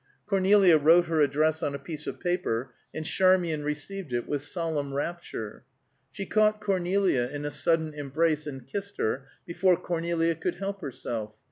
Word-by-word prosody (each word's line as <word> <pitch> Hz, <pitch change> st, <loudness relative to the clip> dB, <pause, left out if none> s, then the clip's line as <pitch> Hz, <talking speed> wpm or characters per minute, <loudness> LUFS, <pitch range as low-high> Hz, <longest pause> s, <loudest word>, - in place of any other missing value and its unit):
Cornelia 195 Hz, -4 st, +5 dB
wrote 165 Hz, +4 st, +6 dB
her 160 Hz, -2 st, +1 dB
address 155 Hz, +3 st, +2 dB
on 140 Hz, -, -1 dB
a -, -, -2 dB
piece 150 Hz, +1 st, -7 dB
of -, -, -5 dB
paper, 140 Hz, -10 st, -1 dB, 0.2 s
and 155 Hz, -, -5 dB
Charmian 180 Hz, -4 st, +3 dB
received 150 Hz, +3 st, -4 dB
it 120 Hz, 0 st, -1 dB
with 145 Hz, -2 st, -1 dB
solemn 145 Hz, -3 st, -2 dB
rapture. 145 Hz, -9 st, -5 dB, 0.5 s
She 195 Hz, +9 st, -6 dB
caught 215 Hz, 0 st, +3 dB
Cornelia 190 Hz, -9 st, +1 dB
in 145 Hz, 0 st, -5 dB
a 145 Hz, -, -2 dB
sudden 160 Hz, +1 st, +1 dB
embrace 150 Hz, +2 st, 0 dB
and 135 Hz, -4 st, -7 dB
kissed 200 Hz, +8 st, -5 dB
her, 130 Hz, +5 st, -1 dB, 0.2 s
before 175 Hz, +1 st, +2 dB
Cornelia 170 Hz, -1 st, 0 dB
could 160 Hz, -, -3 dB
help 195 Hz, +1 st, -4 dB
herself. 115 Hz, -6 st, -5 dB
160 Hz, 160 wpm, -27 LUFS, 145-180 Hz, 0.5 s, wrote